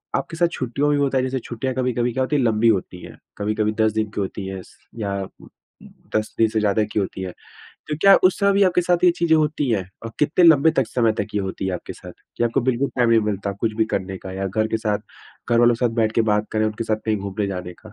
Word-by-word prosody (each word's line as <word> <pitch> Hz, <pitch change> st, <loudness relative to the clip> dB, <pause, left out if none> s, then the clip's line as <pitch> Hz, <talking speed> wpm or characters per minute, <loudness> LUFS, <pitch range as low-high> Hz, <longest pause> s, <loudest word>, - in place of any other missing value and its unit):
आपके 165 Hz, -, -3 dB
साथ 170 Hz, +1 st, +3 dB
छुट्टियों 130 Hz, 0 st, -2 dB
में 145 Hz, -, +2 dB
भी 145 Hz, -, +2 dB
होता 135 Hz, -1 st, +1 dB
है? 130 Hz, -, +1 dB
जैसे 130 Hz, 0 st, -2 dB
छुट्टियाँ 125 Hz, +2 st, -4 dB
कभी-कभी 125 Hz, -2 st, 0 dB
क्या 130 Hz, +2 st, 0 dB
होती 140 Hz, +3 st, -1 dB
हैं, 140 Hz, -, +2 dB
लंबी 115 Hz, -1 st, +2 dB
होती 95 Hz, -4 st, 0 dB
हैं, -, -, -12 dB, 0.2 s
कभी-कभी 105 Hz, +1 st, 0 dB
10 110 Hz, 0 st, +3 dB
दिन 110 Hz, -1 st, -1 dB
की 105 Hz, -, -3 dB
होती 95 Hz, 0 st, -4 dB
हैं 95 Hz, -1 st, -6 dB
स -, -, -21 dB, 0.2 s
या 100 Hz, -2 st, -2 dB, 0.9 s
10 110 Hz, 0 st, -1 dB
दिन 115 Hz, -, +4 dB
से 110 Hz, -, 0 dB
ज़्यादा 105 Hz, +1 st, +2 dB
की -, -, 0 dB
होती 95 Hz, -1 st, -3 dB
हैं। 95 Hz, -1 st, -4 dB, 0.6 s
तो 150 Hz, -, -2 dB
क्या 195 Hz, +2 st, +7 dB
उस 185 Hz, 0 st, +4 dB
समय 200 Hz, 0 st, +3 dB
भी 200 Hz, +1 st, +3 dB
आपके 180 Hz, -1 st, +3 dB
साथ 175 Hz, 0 st, +1 dB
ये 180 Hz, -, +7 dB
चीज़ें 165 Hz, -1 st, +3 dB
होती 150 Hz, -2 st, 0 dB
हैं? 95 Hz, -5 st, -1 dB, 0.2 s
और 115 Hz, -, -5 dB
कितने 150 Hz, +4 st, +3 dB
लंबे 160 Hz, -1 st, +6 dB
तक 135 Hz, -, +3 dB
समय 115 Hz, -3 st, +2 dB
तक -, -, -2 dB
ये 105 Hz, -, +1 dB
होती 95 Hz, 0 st, -4 dB
है 95 Hz, -, -1 dB
आपके 90 Hz, -, -7 dB
साथ, -, -, -12 dB, 0.2 s
कि 120 Hz, -, +1 dB
आपको 115 Hz, -, +1 dB
बिल्कुल 130 Hz, +2 st, 0 dB
टाइम 120 Hz, -2 st, +3 dB
नहीं 115 Hz, -1 st, +5 dB
मिलता 100 Hz, 0 st, -3 dB
कुछ 110 Hz, -2 st, -1 dB
भी 110 Hz, -, +4 dB
करने 95 Hz, 0 st, -3 dB
का, 95 Hz, -, -8 dB
या 95 Hz, +1 st, -3 dB
घर 110 Hz, +3 st, 0 dB
के 110 Hz, -, 0 dB
साथ 105 Hz, -2 st, -1 dB, 0.5 s
घर 120 Hz, -, +4 dB
वालों 120 Hz, 0 st, +5 dB
के 125 Hz, -, -2 dB
साथ 115 Hz, -, -3 dB
बैठ 110 Hz, -1 st, +2 dB
के 115 Hz, -, +2 dB
बात 105 Hz, +1 st, 0 dB
करें, 110 Hz, 0 st, +1 dB
उनके 110 Hz, +1 st, -3 dB
साथ 110 Hz, -1 st, 0 dB
कहीं 110 Hz, -1 st, +1 dB
घूमने 100 Hz, +1 st, -3 dB
जाने 90 Hz, -2 st, -5 dB
का? 110 Hz, -, -12 dB
115 Hz, 270 wpm, -22 LUFS, 105-130 Hz, 0.9 s, क्या